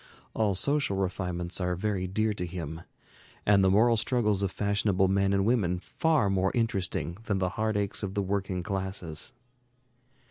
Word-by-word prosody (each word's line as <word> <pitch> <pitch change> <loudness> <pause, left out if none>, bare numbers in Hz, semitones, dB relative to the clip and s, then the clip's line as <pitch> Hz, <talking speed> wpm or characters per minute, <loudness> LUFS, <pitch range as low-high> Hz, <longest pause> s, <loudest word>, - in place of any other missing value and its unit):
All 105 -3 +1
social 140 -2 +1
refinements 90 -1 -2
are 90 0 0
very 95 0 -1
dear 110 +3 0
to 90 -3 -3
him, 80 -2 -6 0.6
and 100 -2 +5
the 95 - +5
moral 115 +4 +4
struggles 105 -4 +1
of 100 - +1
fashionable 100 -2 +1
men 100 +1 +2
and 100 0 +2
women 105 -7 +2
far 155 - +1
more 95 -1 +1
interesting 95 -5 -1
than 100 -3 0
the 95 -1 0
heart 110 +2 -1
aches 100 -1 -1
of 100 -2 -4
the 100 - +1
working 95 -2 -2
classes. 95 - -4
100 Hz, 165 wpm, -28 LUFS, 90-105 Hz, 0.6 s, and